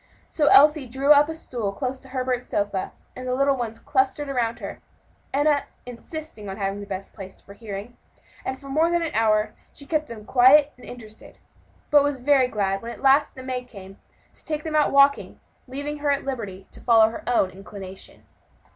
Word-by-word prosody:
So 300 Hz, -2 st, +1 dB
Elsie 295 Hz, -1 st, +6 dB
drew 270 Hz, +4 st, +1 dB
up 295 Hz, +1 st, +6 dB
a 320 Hz, -, -4 dB
stool 235 Hz, -10 st, -4 dB
close 260 Hz, +3 st, -4 dB
to 270 Hz, -, -15 dB
Herbert's 255 Hz, -1 st, -2 dB
sofa, 200 Hz, -2 st, -2 dB, 0.2 s
and 255 Hz, 0 st, -7 dB
the 250 Hz, -, 0 dB
little 275 Hz, +1 st, +2 dB
ones 230 Hz, -3 st, -4 dB
clustered 270 Hz, +2 st, 0 dB
around 240 Hz, -4 st, -1 dB
her, -, -, -7 dB, 0.5 s
Enna 290 Hz, +1 st, +2 dB, 0.2 s
insisting 245 Hz, -2 st, -8 dB
on 195 Hz, -, -6 dB
having 195 Hz, -1 st, -2 dB
the 205 Hz, -, -8 dB
best 195 Hz, -1 st, -6 dB
place 190 Hz, -2 st, -10 dB
for 200 Hz, -, -14 dB
hearing; 205 Hz, +2 st, -8 dB, 0.5 s
and 260 Hz, -, -4 dB
for 275 Hz, -, -13 dB
more 310 Hz, +5 st, +2 dB
than 345 Hz, 0 st, +1 dB
an 325 Hz, -, -3 dB
hour 215 Hz, -1 st, +2 dB, 0.2 s
she 280 Hz, -, -9 dB
kept 305 Hz, +1 st, -1 dB
them 220 Hz, -3 st, -10 dB
quiet 275 Hz, +5 st, +5 dB
and 250 Hz, -, -15 dB
interested; 220 Hz, -3 st, -12 dB, 0.5 s
but 290 Hz, -1 st, +6 dB
was 285 Hz, -2 st, -1 dB
very 265 Hz, 0 st, +3 dB
glad 195 Hz, -4 st, -1 dB
when 230 Hz, -, -7 dB
at 235 Hz, -, -10 dB
last 275 Hz, +2 st, +4 dB
the 260 Hz, -, -9 dB
maid 250 Hz, -1 st, -4 dB
came 195 Hz, -4 st, -12 dB, 0.3 s
to -, -, -17 dB
take 305 Hz, -1 st, -4 dB
them 315 Hz, -1 st, -4 dB
out 300 Hz, -1 st, +3 dB
walking, 280 Hz, 0 st, +3 dB, 0.3 s
thus -, -, -18 dB
leaving 290 Hz, +2 st, -4 dB
her 290 Hz, 0 st, -1 dB
at 280 Hz, 0 st, 0 dB
liberty 205 Hz, -8 st, -5 dB
to -, -, -12 dB
follow 225 Hz, -2 st, +5 dB
her 225 Hz, -, -8 dB
own 195 Hz, -6 st, +2 dB
inclination. 190 Hz, 0 st, -11 dB
255 Hz, 200 wpm, -24 LUFS, 215-285 Hz, 0.5 s, Elsie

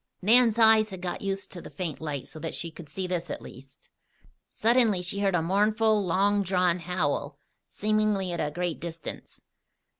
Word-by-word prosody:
Nan's 230 Hz, +2 st, +5 dB
eyes 220 Hz, -1 st, +6 dB
had 190 Hz, -2 st, -8 dB
got 180 Hz, -1 st, -4 dB
used 195 Hz, 0 st, -3 dB
to 175 Hz, -, -8 dB
the -, -, -10 dB
faint 155 Hz, +1 st, -5 dB
light 145 Hz, -4 st, -4 dB
so 155 Hz, -, -8 dB
that 165 Hz, +1 st, -4 dB
she 165 Hz, 0 st, -4 dB
could 160 Hz, -2 st, -12 dB
see 185 Hz, +5 st, -4 dB
this 180 Hz, -2 st, -3 dB
at -, -, -4 dB
least. 135 Hz, +2 st, -14 dB, 0.6 s
Suddenly 225 Hz, -5 st, +2 dB
she 180 Hz, +3 st, -3 dB
heard 195 Hz, -2 st, +1 dB
a 165 Hz, -, +1 dB
mournful, 210 Hz, +3 st, +2 dB
long 200 Hz, +3 st, +2 dB
drawn 180 Hz, -2 st, +1 dB
howl, 155 Hz, -5 st, -2 dB, 0.3 s
seemingly 210 Hz, -3 st, 0 dB
at 170 Hz, -, -4 dB
a 150 Hz, -, 0 dB
great 175 Hz, +1 st, -3 dB
distance. 165 Hz, 0 st, -8 dB
185 Hz, 180 wpm, -27 LUFS, 165-210 Hz, 0.6 s, eyes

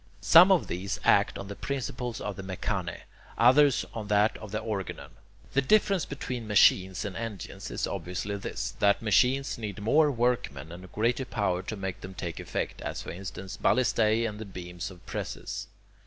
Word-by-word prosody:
Some 180 Hz, +4 st, +8 dB
of 185 Hz, -5 st, +4 dB
these 95 Hz, +3 st, -3 dB
act -, -, +4 dB
on 100 Hz, -, -7 dB
the 100 Hz, -, -6 dB
principle 125 Hz, -2 st, -4 dB
of 105 Hz, -2 st, -4 dB
the 95 Hz, -, -6 dB
[Greek: 95 Hz, -1 st, -7 dB
mechane], 90 Hz, -5 st, -2 dB, 0.4 s
others 130 Hz, +2 st, +5 dB
on 110 Hz, -2 st, -5 dB
that 105 Hz, +1 st, +3 dB
of 110 Hz, -, -9 dB
the 105 Hz, -, -2 dB
[Greek: 110 Hz, -, -9 dB
organon]. 100 Hz, -4 st, -4 dB, 0.4 s
The 140 Hz, -, +4 dB
difference 195 Hz, +3 st, +3 dB
between 125 Hz, -4 st, -5 dB
"machines" 95 Hz, -2 st, +4 dB
and 100 Hz, -2 st, -5 dB
"engines" 110 Hz, -5 st, -6 dB
is -, -, -2 dB
obviously 95 Hz, +3 st, -4 dB
this, 100 Hz, -, -4 dB
that 100 Hz, +2 st, +3 dB
machines 125 Hz, +6 st, +2 dB
need 105 Hz, -3 st, -5 dB
more 150 Hz, +9 st, +4 dB
workmen 120 Hz, -, -1 dB
and 90 Hz, +1 st, -10 dB
greater 115 Hz, +5 st, +1 dB
power 95 Hz, -7 st, -1 dB
to 105 Hz, +3 st, -6 dB
make 95 Hz, -2 st, -5 dB
them 95 Hz, 0 st, -8 dB
take 85 Hz, -2 st, -5 dB
effect, -, -, -4 dB
as -, -, -4 dB
for -, -, -6 dB
instance 95 Hz, +1 st, -7 dB
ballistae 110 Hz, -1 st, +2 dB
and 105 Hz, -1 st, -6 dB
the 110 Hz, -, -6 dB
beams 90 Hz, -3 st, -7 dB
of 90 Hz, -2 st, -15 dB
presses. -, -, -5 dB
105 Hz, 185 wpm, -28 LUFS, 95-120 Hz, 0.4 s, Some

